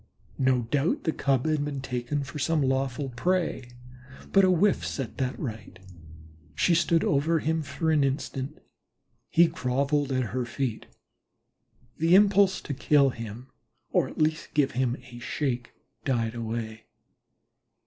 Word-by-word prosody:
No 130 -2 +2
doubt 140 +7 0
the 160 - +1
Cub 135 -3 0
had 155 -2 +1
been 145 -1 -3
taken 130 +2 -3
for 140 +2 -7
some 155 +1 +1
lawful 135 +1 -1
prey, 160 0 -1 0.6
but 195 - +5
a 185 - +5
whiff 185 +3 +3
set 135 -5 -4
that 130 -1 -1
right. 110 -7 -6 0.8
She 170 - +3
stood 170 0 +3
over 150 +4 +2
him 160 +1 0
for 160 +2 -2
an 150 -2 +3
instant. 135 +1 -3 0.7
He 170 - +6
grovelled 140 -2 0
at 130 -6 -1
her 130 -1 0
feet. 120 -1 -3 1.1
The 165 +3 +5
impulse 200 -1 +5
to 145 - -5
kill 140 0 +3
him 115 +2 -8 0.4
or - - +2
at - - -11
least 155 0 -1
give 145 -2 +3
him 125 0 0
a 120 -1 -11
shake 120 -2 -3 0.3
died 115 -4 0
away. 115 -1 -5
140 Hz, 145 wpm, -27 LUFS, 125-155 Hz, 1.1 s, He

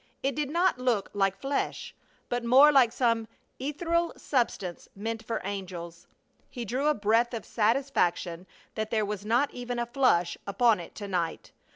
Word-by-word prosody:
It 275 +1 +1
did 295 -2 -2
not 345 -2 +2
look 240 -6 0
like 195 -1 +1
flesh, 275 +1 -2 0.3
but 245 0 -2
more 265 +5 +7
like 260 -5 +5
some 230 -3 +1 0.3
ethereal 335 +5 0
substance 215 - -2
meant 220 +2 -4
for 230 - -3
angels. 180 -3 -6 0.4
He 245 -3 -6
drew 255 +7 -1
a 300 - +3
breath 225 +4 +2
of 225 - -6
satisfaction 210 -7 0 0.3
that 220 0 -3
there 215 -2 +1
was 205 -1 -4
not 245 +6 +2
even 245 0 -4
a 240 - 0
flush 235 -9 +2
upon 225 0 +3
it 170 - -10
to 205 - -6
night. 175 -4 -2
230 Hz, 165 wpm, -28 LUFS, 200-265 Hz, 0.4 s, more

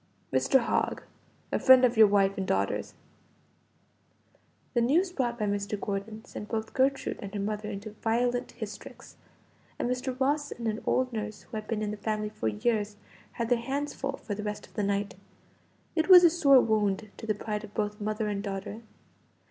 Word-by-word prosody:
"Mr. 135 - +4
Hogg, 235 - -1 0.5
a - - +1
friend 260 -1 +7
of 245 0 +1
your 220 -1 +8
wife 195 -1 +3
and 190 -1 -3
daughters." 100 +1 -1 1.8
The 240 - +2
news 335 +10 +3
brought 245 -8 -1
by 215 - -1
Mr. 205 0 -2
Gordon 205 +2 -4
sent 210 - -8
both 220 -1 -3
Gertrude 270 +1 +1
and 200 - -6
her - - -2
mother 210 +1 -3
into 205 +1 -6
violent 245 +3 -1
hysterics, 220 -3 -9 0.6
and - - -1
Mr. 250 +1 -2
Ross 290 +2 +1
and 235 -1 -4
an 220 +1 -2
old 255 -1 +1
nurse 215 -1 -4
who 240 - -11
had 215 0 -5
been 215 -2 -2
in 210 - -2
the 210 - -5
family 215 0 -2
for 215 0 -4
years, 210 -1 0 0.4
had 230 -1 -3
their 245 -1 +3
hands 280 +4 -2
full 275 0 -4
for 210 - -5
the 205 - -4
rest 210 0 -4
of - - -23
the - - -2
night. 200 0 -1 0.8
It 320 +2 +1
was 360 -1 +10
a 340 - +7
sore 280 -6 +6
wound 215 -2 0
to 225 - -8
the 215 - +1
pride 210 +1 -4
of 210 -1 -11
both 210 0 -2
mother 215 +1 -1
and 205 -1 -2
daughter. 200 +2 -5
215 Hz, 190 wpm, -29 LUFS, 205-250 Hz, 1.8 s, was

